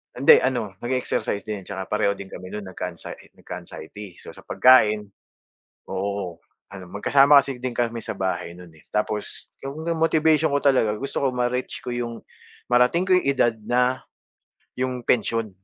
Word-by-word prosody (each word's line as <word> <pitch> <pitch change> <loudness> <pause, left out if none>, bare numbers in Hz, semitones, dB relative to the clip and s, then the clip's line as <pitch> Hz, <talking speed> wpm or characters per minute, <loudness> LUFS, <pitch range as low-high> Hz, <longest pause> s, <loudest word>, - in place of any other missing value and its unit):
hindi 135 - +7
ano, 120 -6 -1
mag-exercise 120 -4 -2
din, 105 -4 -6
tsaka 95 -1 -6
pareho 100 -1 +1
din 100 -1 -10
kami 95 - -8
no'n 100 -3 -7
nagka-ansay 90 -2 -8
nagka-anxiety. 105 -4 -9
So, - - -11
sa - - -15
pagkain 110 -5 +5 0.9
oo, 95 -2 -3 0.3
ano 95 -2 -10
magkasama 140 +7 +6
kasi 135 -1 -5
din 125 0 -4
kami 115 -1 -2
sa - - -3
bahay 90 -2 -3
nun 90 0 -12
eh, 80 - -21
tapos 105 0 -3 0.2
yung 140 +3 -6 0.2
motivation 160 -1 +3
ko 140 - +2
talaga 130 -6 +3
gusto 140 +5 -3
ko 130 - +1
ma-reach 125 +1 -2
ko - - -9
yung 120 -1 -4 0.5
marating 125 +10 +3
ko 185 - +6
yung 180 - +1
edad 120 -4 +2
na 125 +2 +1 0.7
yung 130 -1 -2
pensyon, 115 -1 0
120 Hz, 155 wpm, -24 LUFS, 100-130 Hz, 0.9 s, hindi